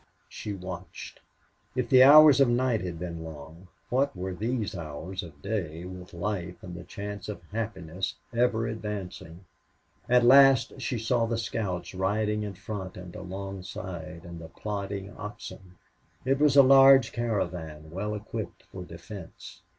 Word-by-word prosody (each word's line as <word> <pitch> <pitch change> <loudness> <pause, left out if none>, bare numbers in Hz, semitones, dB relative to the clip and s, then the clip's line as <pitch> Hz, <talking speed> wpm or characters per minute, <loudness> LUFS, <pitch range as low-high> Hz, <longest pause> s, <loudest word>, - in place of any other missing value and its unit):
She 105 - -6
watched. 90 -2 -8 0.6
If 125 -2 0
the 130 +1 +7
hours 145 +1 +9
of 135 - +5
night 120 -2 +1
had 90 -2 -4
been 85 -1 -5
long, 80 +3 -10 0.2
what 135 +1 +1
were 95 +1 -3
these 110 +2 -2
hours 85 +3 -5
of 75 -6 -12
day 90 -5 -3
with 90 0 -9
life 90 -1 -4
and 90 - -8
the 85 0 -8
chance 100 +3 -7
of 105 - -6
happiness 95 -5 -4 0.2
ever 115 -1 +2
advancing? 100 -6 -6 0.6
At 125 0 +5
last 135 -1 +6
she 125 0 -2
saw 115 +1 +1
the 115 0 -1
scouts 95 -6 -3
riding 105 +3 0
in 105 -2 -5
front 95 -1 -6
and 90 -1 -9
alongside, 95 -3 -7
and 85 -1 -9
the 80 - -9
plodding 100 0 -5
oxen. 105 -3 -9 0.5
It 135 +1 +2
was 150 -1 +4
a 140 - +10
large 135 0 +7
caravan, 85 -10 -3
well 105 +4 -3
equipped 105 - -6
for 90 - -7
defense. 85 +1 -10
100 Hz, 150 wpm, -28 LUFS, 90-115 Hz, 0.6 s, a